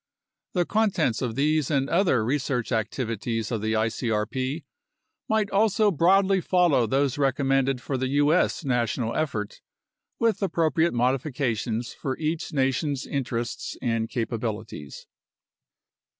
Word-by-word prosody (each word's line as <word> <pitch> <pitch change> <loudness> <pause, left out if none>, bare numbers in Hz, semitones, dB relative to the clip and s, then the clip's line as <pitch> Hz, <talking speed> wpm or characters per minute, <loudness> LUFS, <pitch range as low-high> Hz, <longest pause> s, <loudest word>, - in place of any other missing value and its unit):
The 180 -2 +1
contents 185 - +1
of 120 -4 -2
these 150 +1 +1
and 135 -3 +1
other 165 - +2
research 130 -2 -1
activities 115 0 -2
of 115 -3 -1
the 110 +1 0
icrp 115 +6 -1 0.7
might 220 -2 +1
also 210 +1 +3
broadly 190 +3 +3
follow 170 -10 +3
those 135 +3 +1
recommended 135 -1 +1
for 135 +2 -3
the 130 - 0
U.S. 145 +4 +2
national 120 -2 0
effort, 115 -10 -3 0.6
with 230 -2 +1
appropriate 165 -4 +1
modifications 125 -2 -1
for 130 -1 -4
each 160 +2 -2
nation's 135 0 0
interests 120 -4 -3
and 115 -2 -1
capabilities. 110 - -4
135 Hz, 115 wpm, -25 LUFS, 115-160 Hz, 0.7 s, also